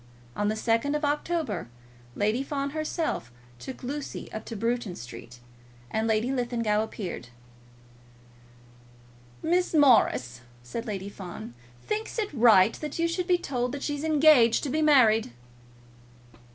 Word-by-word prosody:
On 205 - 0
the 215 - 0
2nd 230 +6 +1
of 300 0 0
October 290 - -1 0.5
Lady 215 +5 +1
Fawn 275 0 -3
herself 310 - -3 0.3
took 260 - -8
Lucy 280 +3 -5
up 215 - -6
to 230 - -6
Bruton 230 -3 -2
Street, 120 0 -10 0.5
and 220 +1 0
Lady 220 +3 +1
Linlithgow 235 -4 0
appeared. 190 - -6 2.2
"Miss 355 +1 +1
Morris," 125 - +4 0.2
said 230 - -6
Lady 200 -2 -4
Fawn, 175 - -8 0.3
"thinks 435 +2 -3
it 420 -7 -2
right 225 -5 +6
that 300 -2 -5
you 335 0 +2
should 350 +1 -2
be 360 -2 +4
told 250 -6 -2
that 285 - -5
she's 290 0 -3
engaged 300 -7 +5
to 290 - -2
be 310 +3 0
married." 230 - +4
245 Hz, 135 wpm, -27 LUFS, 215-300 Hz, 2.2 s, right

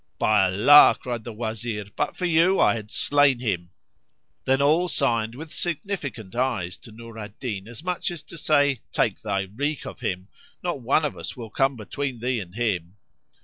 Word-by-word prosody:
"By 105 -3 +4
Allah," 110 +11 +7
cried 120 -3 -4
the 120 - -6
Wazir, 110 -1 -4
"but - - -2
for 180 - -2
you 175 +3 +4
I - - +5
had 110 -2 -6
slain 145 0 +3
him!" 95 -8 -2 0.8
Then 135 +1 +3
all 155 +6 +3
signed 115 -8 0
with 155 +3 -9
significant 155 - -4
eyes 115 -9 -1
to 115 - -14
Nur 115 0 -11
al 105 -1 -6
Din 105 -6 -4
as 120 +5 -9
much 180 0 -1
as 170 -4 -7
to - - -10
say, 145 -5 +2
"Take 105 - 0
thy 100 -3 -1
wreak 140 +10 -3
of - - -8
him; 90 0 -3 0.4
not 175 -6 -2
one 135 +6 +2
of 145 - -3
us - - -7
will 115 -3 -8
come 135 +3 +1
between 125 +4 -4
thee 125 +1 -1
and 90 -2 -9
him." 95 -6 -1
120 Hz, 190 wpm, -24 LUFS, 105-145 Hz, 0.8 s, Allah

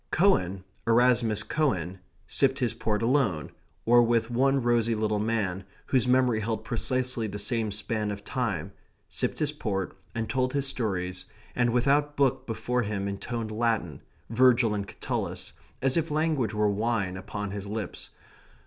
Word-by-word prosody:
Cowan, 95 - +2 0.2
Erasmus 120 -2 +3
Cowan, 95 - -1 0.3
sipped 135 0 +2
his 125 -4 0
port 105 0 -1
alone, 115 - +1 0.3
or 120 +1 +6
with 120 0 +2
one 135 +2 +2
rosy 120 -1 +2
little 105 -1 0
man, 105 -4 -1 0.2
whose 130 -2 +2
memory 125 -3 +3
held 110 0 -3
precisely 125 -1 -1
the 105 0 -5
same 110 0 0
span 105 +1 -2
of 100 0 -5
time; 115 - -2 0.4
sipped - - -2
his 150 -1 +1
port, 100 -10 -3 0.2
and 115 -1 -2
told 130 0 0
his 140 -1 0
stories, 90 -8 -1 0.3
and 120 -1 +2
without 140 +4 +2
book 140 -3 +2
before 125 +2 -1
him 100 -2 -2
intoned 110 +3 -4
Latin, 115 0 -1 0.3
Virgil 120 -2 +4
and 100 -1 -3
Catullus, - - -4 0.3
as 135 +2 +3
if 165 0 0
language 150 -8 0
were 105 0 +2
wine 105 -2 0
upon 100 +2 -5
his 100 0 -5
lips. 105 -1 -5
115 Hz, 150 wpm, -27 LUFS, 105-125 Hz, 0.4 s, or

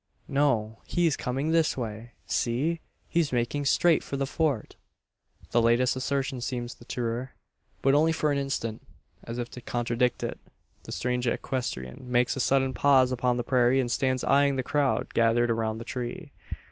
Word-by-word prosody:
"No, 120 -6 +1
he's 170 -5 +2
coming 135 +5 -2
this 165 -3 +2
way! 115 0 -5
See! 145 +8 0 0.3
He's 165 -4 +1
making 125 +4 -1
straight 165 +4 +4
for 140 - -4
the 135 - 0
Fort!" 140 -5 -1 0.8
The 120 - +4
latest 120 +2 +3
assertion 130 -1 -2
seems 120 -1 -3
the - - -17
truer; 120 +2 -3 0.5
but 135 - +4
only 155 +3 +4
for 155 -2 +1
an 140 - +1
instant. 115 -5 -3 0.4
As 115 +1 -6
if 120 -1 -4
to 125 - -9
contradict 120 +1 0
it, - - -4 0.5
the - - -8
strange 125 0 -1
equestrian 120 - -3
makes 120 0 +2
a - - -4
sudden 135 0 +2
pause 130 -2 +4
upon 125 -1 +1
the 120 - -1
prairie, 125 +1 +3
and 120 -2 0
stands 130 0 0
eyeing 140 0 +3
the 130 - -1
crowd 145 +1 0
gathered 115 +1 +3
around 110 -1 -1
the 115 - -6
tree. 130 +7 -5
125 Hz, 170 wpm, -27 LUFS, 120-140 Hz, 0.8 s, straight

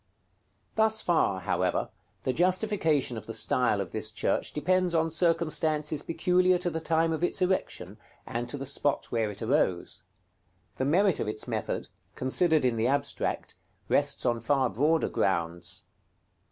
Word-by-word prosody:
§ - - -42
XXVIII. - - -43
Thus 220 0 +3
far, 160 - +2
however, - - 0 0.3
the 130 - 0
justification 175 - +1
of 110 - -8
the 115 - -4
style 110 0 +2
of 95 -4 -4
this 110 0 -3
church 110 - -1
depends 180 +3 +1
on 160 0 +1
circumstances 155 -2 +1
peculiar 180 +2 +2
to 175 0 -2
the 160 - -2
time 165 0 +1
of 160 - -3
its 175 - 0
erection, 185 +1 -1 0.3
and 120 +1 -4
to 145 - -4
the 135 - -5
spot 140 +1 -1
where 115 -2 0
it 105 +2 -7
arose. 90 -5 0 0.8
The 130 - 0
merit 185 +5 +3
of - - -2
its 110 0 -3
method, - - -3 0.3
considered 155 +3 +2
in 120 -2 +1
the 110 +2 +1
abstract, 140 +2 -1 0.4
rests - - +1
on 120 -1 +1
far 130 +2 +1
broader 155 +6 +2
grounds. 85 -2 -2
150 Hz, 160 wpm, -28 LUFS, 115-170 Hz, 0.8 s, Thus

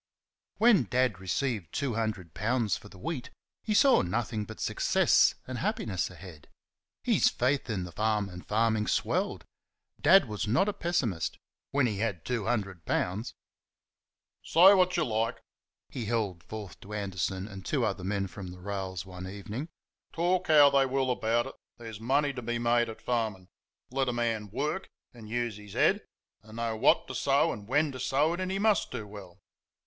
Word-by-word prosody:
When 220 - +5
Dad 125 -4 +1
received 95 - -2
two 140 -4 -1
hundred 110 -7 -3
pounds 110 +3 0
for 105 - -10
the 95 - -14
wheat 130 - -4 0.3
he 215 -1 -1
saw 275 +4 +6
nothing 105 +3 -2
but 110 +1 -10
success - - +3
and 130 -1 -5
happiness 140 - -1
ahead. 90 -4 -12 0.6
His - - +4
faith 130 +2 0
in 100 -5 -1
the 90 - -7
farm 105 +2 0
and 90 -1 -9
farming 110 0 +1
swelled. - - 0 0.6
Dad 190 -7 +6
was 105 0 -3
not 125 - +3
a 210 - 0
pessimist 140 - -1 0.3
when 140 -1 +2
he 105 -5 -1
had 100 -6 -2
two 120 -5 -2
hundred 100 -7 -2
pounds. 100 +9 -2 1.1
"Say 185 +4 +7
what 185 -2 +4
they 170 - +2
like," 115 -2 -1 0.5
he 120 - -5
held 105 -6 -1
forth 105 -3 -8
to 105 - -10
Anderson 95 -1 -2
and 95 -3 -9
two - - 0
other 90 - -2
men 100 +1 -1
across 95 0 -8
the 90 +1 -10
rails 95 -2 -4
one 90 0 -8
evening 105 - -6 0.4
"talk 175 +2 +1
how 145 -2 +7
they 135 -1 +4
will 130 0 0
about 120 0 +1
it, - - -8 0.2
there's 115 -3 -8
money 140 +5 +1
to 125 - -6
be 120 0 -2
made 120 0 +2
at 110 - -10
farming. 110 -6 -2 0.4
Let 135 0 0
a - - -1
man 115 -3 -1
WORK 150 - -3 0.2
and 115 -3 -12
use 120 -2 -2
his 105 -1 -12
HEAD - - +3 0.4
and 110 0 -14
know 115 -1 -1
what 110 - +3
to - - -6
sow - - +2
and 100 -1 -9
when 145 +4 +2
to 130 - -8
sow 140 +5 +2
it, 175 - -4
and 185 0 -2
he 195 - -1
MUST 210 0 +2
do 105 - -5
well." 100 -3 -11
115 Hz, 180 wpm, -29 LUFS, 100-135 Hz, 1.1 s, Say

